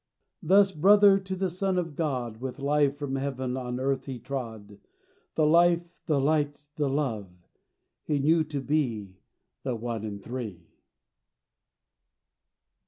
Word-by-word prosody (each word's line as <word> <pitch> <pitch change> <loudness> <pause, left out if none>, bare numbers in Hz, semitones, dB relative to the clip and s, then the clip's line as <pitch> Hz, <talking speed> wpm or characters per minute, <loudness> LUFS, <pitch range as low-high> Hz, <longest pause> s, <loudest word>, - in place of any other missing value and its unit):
Thus 195 +3 +5
brother 195 +4 +6
to 190 0 -5
the 190 +1 0
Son 185 +1 -1
of 165 -4 -2
God 130 -8 -2
With 130 +2 -6
life 145 0 +1
from 140 -2 -3
heaven 130 -2 -3
on 125 -1 -4
earth 135 0 -1
he 130 -2 -4
trod: 110 -6 -6 0.6
The 155 - +3
Life, 170 +2 +3
the 150 -4 +2
Light, 145 0 0
the 145 -2 0
Love, 125 -9 -2 0.7
he 150 - -1
knew 160 +4 +3
to 145 -2 -4
be 115 -10 -1 0.4
The 130 -3 -2
One 115 -1 -4
in 105 -2 -5
Three. 105 -7 -7
140 Hz, 135 wpm, -27 LUFS, 125-160 Hz, 0.7 s, brother